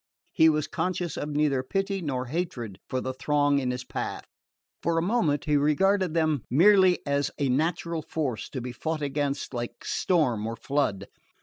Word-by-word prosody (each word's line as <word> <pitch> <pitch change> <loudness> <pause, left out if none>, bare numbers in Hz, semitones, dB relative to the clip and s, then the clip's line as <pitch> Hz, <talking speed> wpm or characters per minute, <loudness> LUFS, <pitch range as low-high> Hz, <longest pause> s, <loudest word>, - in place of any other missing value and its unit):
He 160 0 +5
was 155 -1 +1
conscious 175 -1 -2
of 150 - -4
neither 145 -3 +1
pity 195 +7 -2
nor 130 -5 -2
hatred 125 - -4
for 130 - -1
the 130 - -3
throng 145 +1 +2
in 130 -2 -1
his 125 0 -3
path. - - -4 0.6
For 170 - 0
the 165 - +2
moment 170 - +1
he 150 -1 +2
regarded 175 +5 +2
them 155 -4 +2
merely 185 - +5
as 140 -1 +1
a 140 -2 0
natural 165 +4 0
force, 145 -7 -3
to 130 - -5
be 125 +1 -5
fought 155 +5 -3
against 140 -1 -2
like 120 -1 -5
storm 125 - +1
or 115 - -3
flood. 115 -8 -1
145 Hz, 175 wpm, -27 LUFS, 130-165 Hz, 0.6 s, He